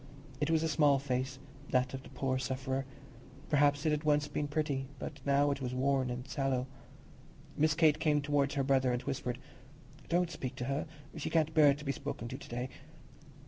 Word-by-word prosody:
It 150 - 0
was 160 -1 +3
a - - +2
small 145 -2 +4
face, 130 -1 -2 0.3
that 125 0 +2
of 135 - -4
the - - -13
poor 130 -1 -1
sufferer; 130 +1 -2 0.6
perhaps 145 0 +3
it 155 - +3
had 150 0 0
once 150 -1 +3
been 145 0 -2
pretty, 145 -3 -1
but 140 +2 -7
now 140 +1 +4
it 140 - -3
was 125 -1 -3
worn 130 0 +2
and 125 +1 -5
sallow. 135 -3 0 0.9
Miss 155 +1 +3
Kate 155 -2 +4
came 150 -2 +3
towards 145 -1 +1
her 140 - +1
brother 130 -1 +3
and 125 +1 -1
whispered, 125 -3 -2 0.7
"Don't 175 0 +2
speak 130 -6 -5
to 125 - -4
her; 140 +4 -1 0.3
she 155 - -3
can't 160 -1 +2
bear 145 -3 +6
to 150 +1 -10
be 140 - +1
spoken 140 -4 -5
to 130 - -5
to - - -11
day." 125 +2 -3
140 Hz, 195 wpm, -33 LUFS, 130-150 Hz, 0.9 s, bear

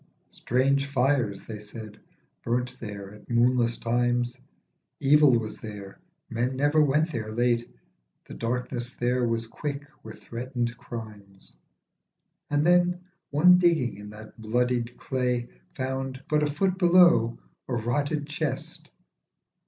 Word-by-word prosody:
Strange 135 +3 +1
fires 130 -7 +1
(they 110 -2 -7
said) 105 0 -10 0.4
burnt 125 +1 -1
there 100 -3 -7
at 105 - -16
moonless 120 0 +2
times. 120 +1 0 0.6
Evil 145 -2 +5
was 110 -2 -5
there, 100 -3 -9 0.3
men 120 +3 -1
never 145 +3 +3
went 150 +3 +2
there 110 -5 -4
late, 120 +1 +1 0.6
The - - -9
darkness 120 +1 -3
there 125 -1 0
was 115 0 -1
quick 140 +5 -5 0.2
with 110 0 -11
threatened 120 0 -3
crimes. 105 -5 -10 0.9
And 145 +1 +1
then 180 0 +3 0.3
one 180 +5 +6
digging 165 - +2
in 105 0 -9
that 110 +1 -12
bloodied 120 +2 0
clay 125 -2 -1 0.3
Found, 130 0 -3
but 150 0 +2
a 150 - +2
foot 185 +5 0
below, 170 -10 +5 0.3
a 125 - 0
rotted 145 +6 -1
chest. 150 0 -4
125 Hz, 125 wpm, -27 LUFS, 115-140 Hz, 0.9 s, one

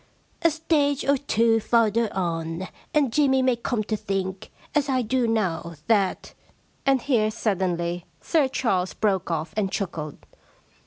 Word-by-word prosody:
* - - -38
A 335 - +5
stage 295 -3 +1
or 280 - +4
two 230 -4 +2
farther 230 -1 +2
on, 165 -1 -2 0.2
and 280 -6 +2
Jimmy 265 -3 +3
may 255 -1 +3
come 235 -1 -2
to 215 +1 -2
think, 190 -2 -3 0.2
as 290 -1 +1
I 255 -2 +2
do 245 +1 +1
now, 180 -7 -1
that 205 -5 +1 0.3
' - - -38
And 270 -3 +3
here 230 -6 +2
suddenly 180 -5 -1
Sir 310 -5 +2
Charles 195 -8 0
broke 195 -4 0
off 160 -1 -2
and 200 -3 0
chuckled. 160 -7 -4
220 Hz, 155 wpm, -25 LUFS, 185-260 Hz, 0.3 s, A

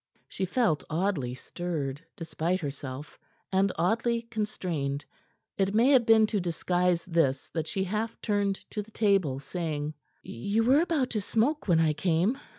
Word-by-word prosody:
She 190 - -3
felt 180 - +1
oddly 155 -7 -1
stirred, 150 -2 -4
despite 170 +2 -2
herself, 140 -2 -6 0.3
and 190 0 +3
oddly 230 +7 +1
constrained. 180 -11 -3 0.5
It 195 +1 +1
may 235 +4 +5
have 250 -4 +5
been 220 -1 +7
to 210 -1 -1
disguise 175 0 0
this 165 -7 +1
that 160 -2 -2
she 190 - -1
half 215 +4 -3
turned 205 -2 0 0.2
to 210 - -2
the 210 - -13
table, 195 -11 +2
saying: 150 0 -3 0.3
"You 200 - -1
were 265 +6 +5
about 320 -7 0
to 215 - -1
smoke 235 +9 0
when 170 -3 +4
I 160 -2 +3
came." 180 - +1
185 Hz, 155 wpm, -28 LUFS, 160-220 Hz, 0.5 s, been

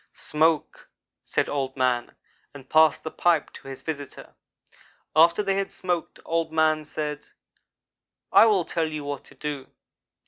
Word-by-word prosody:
"'Smoke,' 155 0 0 0.3
said - - -1
Old 135 -2 -3
man, 125 -2 0 0.4
and 135 -2 -11
passed 155 0 +5
the 160 - -5
pipe 170 -4 +1
to - - -12
his 135 -1 -8
visitor. 145 -3 -7 0.8
After 170 +6 +5
they 195 -1 0
had 195 0 -2
smoked 175 -2 -3
Old 165 -1 -1
man 155 -1 +2
said: 150 -1 -5 1.0
"'I 225 - +8
will 195 -6 +3
tell 165 -1 -1
you 155 -1 -5
what 145 -1 -5
to - - -16
do. 145 -3 -5
155 Hz, 145 wpm, -25 LUFS, 145-165 Hz, 1.0 s, I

